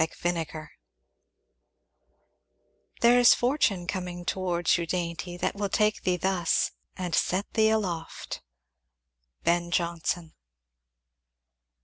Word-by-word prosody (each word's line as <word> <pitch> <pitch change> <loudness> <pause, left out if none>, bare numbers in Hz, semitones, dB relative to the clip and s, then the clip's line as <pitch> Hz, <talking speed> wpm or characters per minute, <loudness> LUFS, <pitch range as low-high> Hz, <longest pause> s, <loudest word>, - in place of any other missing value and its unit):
Chapter 160 +2 -1
XLVI 160 -2 -5 2.3
There 240 +1 +6
is 245 - +8
a - - -2
fortune 240 -8 +1
coming 175 -1 -4
Towards 175 -1 +1
you, 170 - -3
dainty, 175 0 -3
that - - -1
will 200 0 -2
take 210 +2 +2
thee 180 -1 +1
thus, 180 -2 +1 0.3
And 180 -3 -4
set 185 +4 0
thee 220 -1 +4
aloft. 180 -7 -3 1.0
Ben 175 0 +2
Jonson. 170 -1 -1
175 Hz, 105 wpm, -27 LUFS, 170-200 Hz, 2.3 s, is